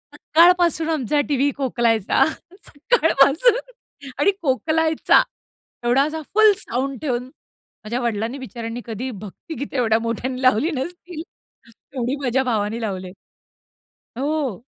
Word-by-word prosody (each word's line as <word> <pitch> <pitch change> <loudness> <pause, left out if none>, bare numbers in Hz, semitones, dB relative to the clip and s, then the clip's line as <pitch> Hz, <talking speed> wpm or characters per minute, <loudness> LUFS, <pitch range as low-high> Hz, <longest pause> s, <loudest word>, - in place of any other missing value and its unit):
सकाळपासून 340 -1 +3
आमचा 295 -2 0
टीव्ही 285 0 +2
खोकलायचा, 235 -6 +2 0.4
सकाळपासून 325 - +3 0.6
आणि 400 - +4
खोकलायचा. 315 +3 +2 0.6
एवढा 255 +3 +4
असा 315 +1 -3
फुल 435 0 +6
साउंड 265 - -3
ठेवून, 250 -5 -1 0.6
माझ्या 235 +4 -3
वडिलांनी 230 +2 -2
बिचाऱ्यांनी 235 -2 -6
कधी 240 +3 -5
भक्ति 210 - -9
गीते 280 -1 -4
एवढ्या 225 -2 +2
मोठ्यांनी 245 +3 -3
लावली 255 +5 +3
नसतील, 345 +3 -6 0.5
तेवढी 245 +3 -5
माझ्या 265 0 +1
भावानी 225 -2 -1
लावले. 185 -4 -4 1.1
हो. 275 -6 -2
260 Hz, 110 wpm, -21 LUFS, 230-315 Hz, 1.1 s, फुल